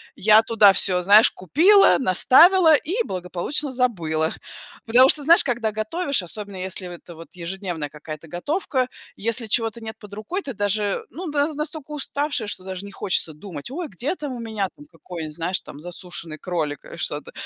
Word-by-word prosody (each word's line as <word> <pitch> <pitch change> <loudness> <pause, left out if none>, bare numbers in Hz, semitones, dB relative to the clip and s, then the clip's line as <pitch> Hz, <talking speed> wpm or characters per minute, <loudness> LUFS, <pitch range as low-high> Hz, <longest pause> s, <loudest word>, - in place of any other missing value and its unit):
я 215 +2 +5
туда 215 -4 +5
всё, 180 -2 +2
знаешь, 205 +5 +6
купила, 360 - +5
наставила 320 - +6
и 360 - -1
благополучно 185 +11 -2
забыла. 165 -11 0 0.5
Потому 250 +4 +6
что, 295 - +2
знаешь, 335 +4 +6
когда 235 -4 -1
готовишь, 280 - -1
особенно, 200 +2 -6
если 185 0 -4
в - - -8
это 175 0 -12
вот 165 +1 -12
ежедневная 175 -3 -5
какая-то 155 +2 -10
готовка, 255 - -2 0.3
если 230 +2 -1
чего-то 225 0 0
нет 220 0 -7
под 205 -2 -13
рукой, 215 - -4
ты 280 -7 -6
даже 205 0 -1
ну 345 +8 -7
да, 290 +1 0
настолько 300 0 -5
уставшая, 285 -4 -3
что 185 - -5
даже 190 +1 -6
не 200 - -10
хочется 185 -4 -2
думать: 160 - -9
ой, 335 +2 -4
где 250 - -3
там 290 -6 -6
у 245 - -7
меня, 220 -4 -3
там, 295 - -15
какой-нибудь, 160 -4 -8
знаешь, 180 +3 -2
там, 145 - -12
засушенный 170 -1 -5
кролик, 155 -6 -3
или - - -11
что-то. - - -3
215 Hz, 175 wpm, -22 LUFS, 180-280 Hz, 0.5 s, знаешь